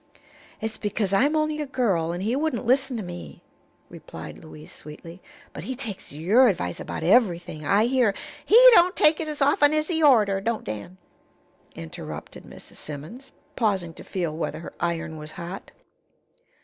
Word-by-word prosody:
"It's 220 0 -4
because 205 -2 -2
I'm 285 +10 +3
only 305 0 0
a 295 - -4
girl, 195 - 0
and 175 +2 -4
he 225 +5 0
wouldn't 285 -5 -1
listen 260 +1 +2
to 215 - -4
me," 85 - -9 0.4
replied - - -10
Louise, 80 0 -12
sweetly. 165 +4 -11 0.3
"But - - -8
he 260 - -4
takes 225 -6 -5
your 195 - +4
advice 125 - -1
about - - -5
everything, 175 - +2
I 205 +6 +4
hear 245 -5 +2
" - - -17
"He 440 - +6 0.2
don't 360 -1 +5
take 305 +1 +4
it 320 - -3
as 300 -2 -1
often 290 +1 +4
as 305 +2 0
he 325 -2 0
orter, 215 -9 +4
don't 225 +2 -2
Dan," 110 - -7 0.8
interrupted 80 -1 -8
Mrs. - - -13
Simmons, 155 - -9 0.2
pausing 195 -8 0
to - - -12
feel 170 -5 -3
whether 155 -2 -3
her - - -9
iron 170 -1 -2
was 155 0 -9
hot. 175 +3 -8
205 Hz, 170 wpm, -25 LUFS, 165-265 Hz, 0.8 s, He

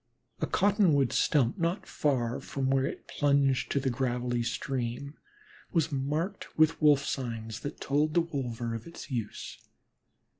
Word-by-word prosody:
A - - 0
cottonwood 185 - +3
stump 135 -1 +2
not 170 +4 0
far 125 -5 0
from 135 -1 -2
where 135 0 +3
it - - -7
plunged 140 -2 +2
to 140 - +2
the 135 -1 0
gravelly 120 -1 -1
stream 125 +3 -3 0.6
was 160 -3 +2
marked 150 +8 -2
with 160 +1 +4
Wolf 145 -2 +5
signs 115 -4 -3
that 145 - -6
told 150 +2 +1
the 170 - +6
wolver 125 -8 -3
of 115 +4 -6
its 170 -3 -10
use. 115 -5 -4
135 Hz, 145 wpm, -29 LUFS, 120-155 Hz, 0.6 s, the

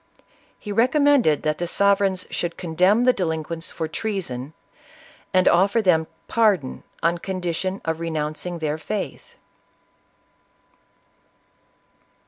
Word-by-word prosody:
He 210 - -6
recom 255 +7 +3
mended 265 - +4
that 155 0 -1
the 175 - -2
sovereigns 195 0 +2
should 175 -1 -2
condemn 185 +7 +2
the 255 0 +5
delin 160 -6 -1
quents 165 +1 -6
for 160 - -3
treason; 160 - -4 0.8
and 185 -1 +3
offer 195 +6 +4
them 170 -6 +3 0.2
pardon 205 - +1 0.2
on 170 +1 +2
condition 185 +1 -3
of 160 0 -1
renouncing 160 +1 -3
their 155 -1 -2
faith. 205 +5 -5
180 Hz, 110 wpm, -23 LUFS, 160-200 Hz, 0.8 s, the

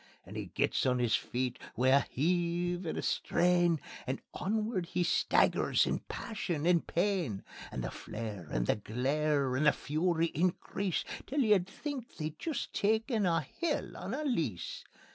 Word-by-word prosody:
And - - -10
he - - -4
gets - - +1
on 125 -1 +3
his 120 -2 +3
feet 125 0 -2 0.2
wi' 130 +1 +3
a 135 +1 +7
heave 175 +3 0
and - - -2
a - - -2
strain, 175 -2 +3 0.3
And 130 +1 -1
onward 210 -2 -1
he 180 +1 0
staggers 170 - +3
in - - 0
passion 175 -9 -4
and 175 -1 +3
pain. 175 - 0 0.3
And 65 - -3
the - - -3
flare 105 -6 -6
and - - 0
the - - +2
glare 135 +5 0
and 150 +4 +3
the - - +8
fury 165 +2 0
increase, 185 +2 0 0.2
Till 285 +1 +1
you'd 210 -6 +4
think 270 +3 -6
they'd 155 -1 -4
jist 320 -3 -3
taken 220 0 +2
a' 165 -2 +3 0.2
hell 330 -4 -1
on 215 - -4
a 305 - -3
lease. 165 - -2
170 Hz, 160 wpm, -32 LUFS, 135-200 Hz, 0.3 s, the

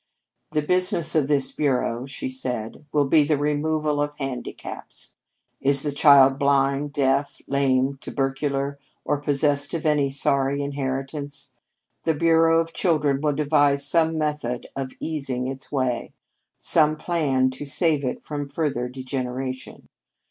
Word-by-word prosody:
"The 150 - +1
business 180 -1 +1
of 155 -4 +2
this 140 -2 +1
bureau," 130 -3 -1
she 130 -2 -5
said, 125 -1 -4
"will 145 -1 +2
be 150 +2 +4
the 150 0 +1
removal 150 0 0
of 145 0 -3
handicaps. 135 -3 -7 0.5
"Is 140 0 +3
the 145 - -1
child 140 -2 +6
blind, 140 +1 +1
deaf, 140 0 0
lame, 135 0 +1
tubercular, 140 +1 -2 0.3
or 150 - +1
possessed 145 0 +1
of 160 - -4
any 150 -2 +2
sorry 140 0 +1
inheritance? 140 +1 -4 0.5
The 160 - +1
Bureau 165 +1 +4
of 165 0 -2
Children 150 -6 +1
will 150 -1 +1
devise 145 -1 +3
some 160 +2 +2
method 150 -6 -2
of 135 -1 -4
easing 135 -5 -2
its 135 0 -7
way; 130 -4 -1 0.4
some 155 -2 +4
plan 140 -6 0
to 130 +3 -7
save 150 0 +2
it 125 - -3
from 145 -1 -5
further 140 -4 -2
degeneration. 130 0 -5
140 Hz, 135 wpm, -24 LUFS, 135-150 Hz, 0.5 s, child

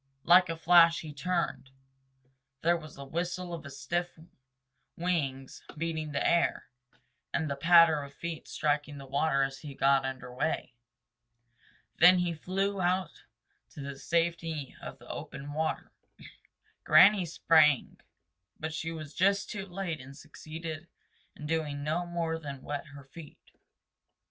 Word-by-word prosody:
Like 180 +1 +6
a 165 - -3
flash 170 0 +6
he 155 -2 -8
turned. 165 -2 -2 0.9
There 170 +1 +4
was 155 -2 -9
the 140 - -9
whistle 175 +4 -3
of 155 -4 -7
stiff 170 +7 -3 0.8
wings 140 -7 -2 0.2
beating 160 -1 -3
the 140 - 0
air 170 0 +2 0.7
and 160 - -1
the 140 - -2
patter 165 +1 +6
of 140 -1 -9
feet 165 -2 -6
striking 145 -1 -1
the 135 - -9
water 140 +1 +1
as 135 0 -3
he 145 -3 -9
got 135 0 +3
under 130 -2 -6
way. 125 -1 -2 1.3
Then 180 +2 +8
he 175 -1 0
flew 195 +4 -2
out 185 -1 -1 0.5
to - - -8
the 140 0 -6
safety 165 -2 -2
of - - -8
the - - -17
open 145 +1 -7
water. 160 +1 -2 0.9
Granny 200 0 +7
sprang, 155 -4 +3 0.6
but 160 0 -4
she 165 +1 -3
was 155 -2 -8
just 200 +2 +1
too 200 -2 -5
late 175 -5 -4
and 135 +2 -12
succeeded 155 +2 -8 0.5
in 150 - -9
doing 150 -2 -2
no 165 +4 -1
more 165 -2 -2
than 140 -4 -8
wet 145 +2 -5
her 140 -1 -12
feet. 145 +3 -13
160 Hz, 140 wpm, -30 LUFS, 140-170 Hz, 1.3 s, Then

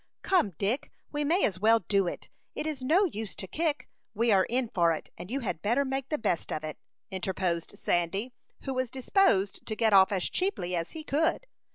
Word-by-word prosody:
"Come, 350 - +2
Dick, 215 +7 -1 0.2
we 295 0 -1
may 335 +6 +3
as 185 -3 -1
well 225 +2 +5
do 195 -3 +1
it. - - -5 0.3
It - - -3
is 305 -4 -3
no 325 +10 +4
use 220 - -4
to - - -4
kick; 305 - -2 0.3
we 230 +2 +2
are 190 -2 +5
in 245 0 0
for 170 -5 +2
it, 155 - -7
and 175 +2 -9
you 270 +4 -2
had 195 -8 -3
better 240 +7 +2
make 270 0 -3
the 305 - 0
best 205 - -1
of 155 - -3
it," 155 0 -6 0.3
interposed 185 -2 -2
Sandy, 195 +8 -1 0.3
who 270 - -2
was 255 -1 -1
disposed 255 - +2
to 215 - -2
get 220 -1 +2
off 190 0 +7
as 190 -3 0
cheaply 185 - -1
as 165 0 -3
he 315 - -6
could. 320 - +1
225 Hz, 210 wpm, -29 LUFS, 190-280 Hz, 0.3 s, off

